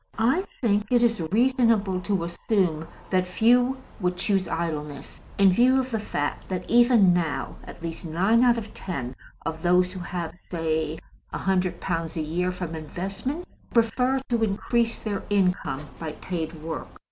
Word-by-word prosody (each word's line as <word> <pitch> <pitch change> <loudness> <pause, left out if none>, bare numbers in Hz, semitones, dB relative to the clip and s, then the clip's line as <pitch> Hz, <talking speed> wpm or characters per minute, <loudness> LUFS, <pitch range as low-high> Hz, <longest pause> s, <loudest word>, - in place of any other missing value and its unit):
I 245 +10 +3 0.2
think 210 -3 +1
it 240 -1 +4
is 230 -5 +2
reasonable 230 -5 +3
to 195 -2 0
assume 170 -2 0 0.2
that 185 -1 +2
few 245 +7 +3 0.2
would 180 -2 0
choose 195 -1 +1
idleness, 150 -4 -4 0.2
in 195 -1 +6
view 250 +7 +5
of 260 0 -2
the 225 - 0
fact 145 -8 -3
that 180 -1 -3
even 235 -6 +6
now 170 -4 -1
at - - -11
least 165 +1 -5
nine 190 +9 +3
out 240 -1 +5
of 220 -2 -6
ten 135 -9 -5 0.3
of 160 0 -3
those 180 +1 +3
who 185 - -6
have 175 -2 -4
(say) 160 -3 -2 0.3
100 185 -2 0
pounds 165 -2 -2
a - - 0
year 175 +4 -1
from 180 -2 -5
investments 195 - -5 0.2
prefer 250 +3 +3
to 235 -2 +1
increase 230 +3 +1
their 205 -3 -3
income 180 -8 +1
by 160 -2 -4
paid 165 -2 -4
work. 160 -1 -4
185 Hz, 160 wpm, -25 LUFS, 165-230 Hz, 0.3 s, in